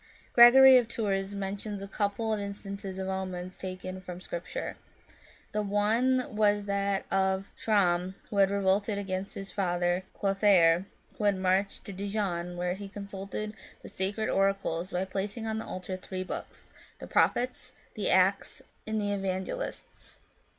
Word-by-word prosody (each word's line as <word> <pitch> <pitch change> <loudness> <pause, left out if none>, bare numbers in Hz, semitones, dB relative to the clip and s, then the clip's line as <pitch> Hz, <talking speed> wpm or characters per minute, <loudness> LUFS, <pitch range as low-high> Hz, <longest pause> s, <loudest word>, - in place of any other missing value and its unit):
Gregory 260 +2 +9
of 245 -2 +2
Tours 200 -4 -2
mentions 200 +1 -4
a - - -6
couple 210 +2 -1
of 215 - -1
in 200 0 -4
stances 195 -1 -7
of 190 0 -3
omens 185 -1 -4
taken 185 0 -6
from 180 -1 -8
Scripture. 185 - -5 0.8
The 210 - 0
one 220 +5 +1
was 205 -1 +3
that 200 -1 0
of 190 0 +1
Chramm, 185 -3 +1 0.2
who 205 - -3
had 195 -1 +5
revolted 200 +1 +1
against 195 -1 -3
his 195 0 -7
father 175 -1 0
Clothaire, 195 -3 +4 0.3
and 205 -2 +3
who - - -6
marched 190 +2 0
to 200 - -7
Dijon, 185 -3 -2
where 180 0 -1
he 200 +1 -7
consulted 200 +1 -6 0.3
the - - -9
Sacred 200 +3 -2
Oracles, 195 -2 0
by 180 +1 -1
placing 200 +4 -4
on 220 0 -2
the - - -6
altar 185 0 -5
three 185 0 -5
books, 185 - -8 0.2
the - - -8
Prophets, 250 +1 +1 0.2
the - - -1
Acts, - - +2 0.2
and 220 0 -1
the 205 -1 -1
Evangelists. 195 - -5
195 Hz, 150 wpm, -29 LUFS, 185-205 Hz, 0.8 s, Gregory